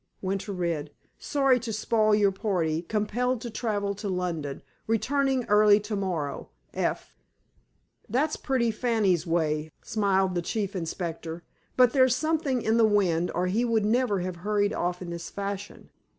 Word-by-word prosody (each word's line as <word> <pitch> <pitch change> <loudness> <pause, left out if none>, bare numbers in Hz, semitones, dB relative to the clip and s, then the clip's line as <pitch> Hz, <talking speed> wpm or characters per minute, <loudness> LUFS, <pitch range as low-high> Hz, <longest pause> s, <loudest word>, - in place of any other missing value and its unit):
Winter 195 +2 -3
read: 170 -5 -2 0.3
"Sorry 275 -3 +2
to 235 -1 -5
spoil 215 0 +2
your 205 -2 +3
party. 175 -6 -1
Compelled 225 +6 -1
to 235 - -6
travel 205 -3 -1
to 205 +1 -5
London. 170 -6 -3 0.2
Returning 265 +3 +1
early 210 0 +5
to 210 +1 -4
morrow. 175 -8 -3 0.2
F." - - -2 0.9
"That's 290 +8 +1
pretty 250 -4 0
Fanny's 210 -7 +1
way," 155 -2 0
smiled 195 -3 +1
the 175 - 0
Chief 200 +2 -3
Inspector. 165 -1 -4 0.3
"But 250 -2 +5
there's 260 -3 +4
something 305 -5 0
in 220 +1 +2
the 230 - +5
wind, 180 -5 +2
or 180 - +1
he 205 +6 +1
would 225 -3 +1
never 220 -3 +1
have 180 -1 -4
hurried 205 +2 0
off 180 -1 -2
in 170 - -6
this 170 0 -6
fashion. 200 0 -6
205 Hz, 150 wpm, -27 LUFS, 180-230 Hz, 0.9 s, early